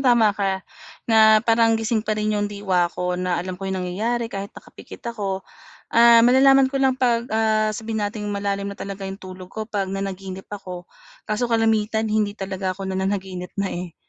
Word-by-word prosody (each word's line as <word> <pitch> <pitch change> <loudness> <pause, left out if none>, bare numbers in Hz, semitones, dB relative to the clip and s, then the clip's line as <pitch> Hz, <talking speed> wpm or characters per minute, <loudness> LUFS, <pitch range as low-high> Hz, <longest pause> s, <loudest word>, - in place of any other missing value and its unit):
tama 240 -5 +4
ka, 195 -1 -2 0.4
na 220 -1 +6
parang 225 0 +4
gising 225 0 0
pa 215 0 -2
rin 215 0 0
'yong 205 0 0
diwa 190 -4 0
ko, 180 +1 -3
na 180 -1 0
alam 185 +2 -3
ko 195 0 -4
yung 190 - -2
nangyayari 230 +6 -2
kahit 200 0 -4
nakapikit - - -13
ako. 195 -3 -3 0.4
Ah, 235 0 +7
malalaman 265 +3 +6
ko 270 - -7
lang 265 -1 +2
'pag, 235 -2 +1
ah, 215 -1 +2
sabihin 220 0 -3
nating 210 0 -4
malalim 200 -1 -2
na 200 - -6
talaga 195 -1 -6
yung 195 +1 -8
tulog 185 -1 -9
ko 220 +3 -5
'pag 205 -3 -3
nanaginip 195 0 -5
ako. 185 -3 -7 0.4
Kaso 225 +3 -1
kalimitan, 220 -1 +1
hindi 210 -1 0
talaga 190 -1 -3
ako 190 0 -5
nananaginip 190 -1 -3
na, 200 -1 -1
eh. 175 -1 -6
205 Hz, 185 wpm, -22 LUFS, 190-225 Hz, 0.4 s, Ah